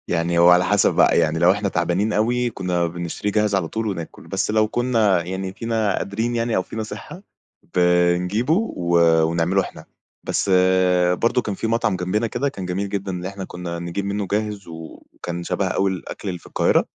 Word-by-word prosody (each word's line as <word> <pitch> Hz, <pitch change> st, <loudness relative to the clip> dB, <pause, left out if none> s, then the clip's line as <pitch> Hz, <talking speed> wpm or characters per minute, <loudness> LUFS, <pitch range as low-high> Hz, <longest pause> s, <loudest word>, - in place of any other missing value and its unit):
يعني 85 Hz, 0 st, 0 dB
هو 85 Hz, +1 st, +7 dB
على 90 Hz, 0 st, +5 dB
حسب 105 Hz, +2 st, +3 dB
بقى، -, -, +4 dB
يعني 80 Hz, +1 st, +1 dB
لو 85 Hz, +2 st, +6 dB
إحنا 100 Hz, +1 st, -1 dB
تعبانين 90 Hz, +5 st, 0 dB
أوي 120 Hz, +3 st, +1 dB
كنا 90 Hz, -5 st, -1 dB
بنشتري 85 Hz, +4 st, -4 dB
جاهز 105 Hz, -1 st, +1 dB
على 95 Hz, -4 st, 0 dB
طول 110 Hz, +5 st, -3 dB
وناكل، 85 Hz, -5 st, -6 dB
بس -, -, -1 dB
لو 110 Hz, 0 st, +3 dB
كنا 110 Hz, -6 st, +2 dB
يعني 95 Hz, +2 st, -4 dB
فينا 110 Hz, -2 st, -1 dB
قادرين 110 Hz, +4 st, -2 dB
يعني 115 Hz, 0 st, 0 dB
أو -, -, +2 dB
فينا 110 Hz, +4 st, -5 dB
صحة 175 Hz, -, -9 dB, 0.5 s
بنجيبه 90 Hz, -, +2 dB
و 90 Hz, -, 0 dB, 0.3 s
ونعمله 85 Hz, +4 st, +1 dB
إحنا، -, -, -9 dB, 0.4 s
بس -, -, -1 dB, 0.6 s
برضه 115 Hz, +6 st, +1 dB
كان 105 Hz, -4 st, -4 dB
في 110 Hz, -, -3 dB
مَطعَم 115 Hz, -3 st, +1 dB
جنبنا 90 Hz, +6 st, -1 dB
كده 140 Hz, +5 st, -1 dB
كان 95 Hz, -8 st, -7 dB
جميل 95 Hz, +2 st, -2 dB
جدًا 100 Hz, -1 st, -3 dB
اللي 90 Hz, 0 st, -4 dB
إحنا 100 Hz, 0 st, -6 dB
كنا 85 Hz, -1 st, -6 dB
نجيب 85 Hz, +3 st, -4 dB
منه 100 Hz, 0 st, -2 dB
جاهز 105 Hz, -2 st, -2 dB
وكان 85 Hz, +1 st, -8 dB
شبه -, -, -1 dB
أوي 95 Hz, 0 st, +1 dB
الأكل 95 Hz, +2 st, -7 dB
اللي 90 Hz, -1 st, -5 dB
في -, -, -16 dB
القاهرة، -, -, +2 dB
95 Hz, 185 wpm, -22 LUFS, 90-110 Hz, 0.6 s, هو